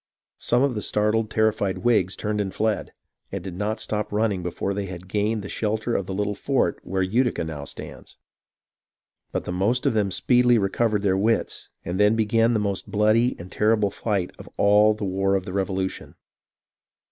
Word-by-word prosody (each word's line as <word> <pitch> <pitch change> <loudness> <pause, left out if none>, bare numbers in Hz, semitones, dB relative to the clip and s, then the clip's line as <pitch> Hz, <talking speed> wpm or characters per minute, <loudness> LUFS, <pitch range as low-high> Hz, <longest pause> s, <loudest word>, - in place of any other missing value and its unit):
Some 120 +2 +2
of 140 -2 +2
the 105 - -3
startled, 105 +1 +1
terrified 110 -3 +1
Whigs 105 -6 +2
turned 105 0 -2
and 95 -2 -3
fled, 110 +1 -1 0.4
and 100 -2 -4
did 95 -2 -6
not 105 +4 -2
stop 105 -1 -1
running 105 -3 0
before 90 +3 -3
they 100 0 -3
had 90 0 -8
gained 105 +2 -1
the - - -6
shelter 110 +3 -2
of 95 - -1
the 95 - -4
little 105 +1 -1
fort - - 0
where 95 0 -1
Utica 120 +3 +1
now 75 -3 -6
stands; - - -9 1.1
but - - -3
the - - -3
most 105 +9 +1
of 140 - +3
them 105 -3 +1
speedily 125 +4 +3
recovered 105 +1 +1
their 95 -2 +2
wits, 110 +4 0 0.2
and 90 +3 -3
then 105 +2 +5
began 115 +1 +2
the - - +2
most 100 -2 -2
bloody 110 +3 +3
and 90 +2 -10
terrible 105 -2 +2
fight 100 -5 -2
of - - -11
all 105 +1 +5
the 105 -1 -4
war 95 +1 +1
of 95 -1 -1
the - - -6
Revolu 95 -1 0
tion. - - -10
105 Hz, 190 wpm, -24 LUFS, 95-110 Hz, 1.1 s, then